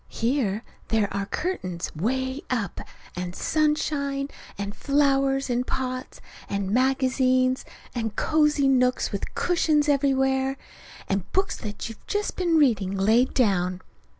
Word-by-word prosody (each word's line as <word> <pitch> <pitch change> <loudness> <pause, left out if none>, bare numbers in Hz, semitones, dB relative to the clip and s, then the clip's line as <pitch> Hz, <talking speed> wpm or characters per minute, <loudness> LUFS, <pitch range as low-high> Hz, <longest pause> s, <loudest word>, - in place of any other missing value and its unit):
Here 230 -3 0 0.2
there 215 -3 +1
are 200 0 -2
curtains 185 - -3
'way 260 - -1
up 225 -8 -2 0.3
and 180 0 -4
sunshine, 290 -2 0 0.3
and 200 0 -4
flowers 275 -1 +2
in 245 -1 0
pots, 255 0 -4 0.3
and 200 -1 -2
magazines, 255 +1 +2 0.3
and 225 -3 -3
cozy 300 -2 +3
nooks 250 -1 +2
with 200 - -5
cushions 310 -4 +2
everywhere; 270 -1 +2 0.5
and 195 -1 -2
books 385 +1 +1
that 210 -1 -5
you've 225 -1 -11
just 415 0 -1
been 345 -3 +2
reading 205 -10 +2
laid 225 +6 +3
down. 185 -6 +1
255 Hz, 125 wpm, -25 LUFS, 210-280 Hz, 0.5 s, cozy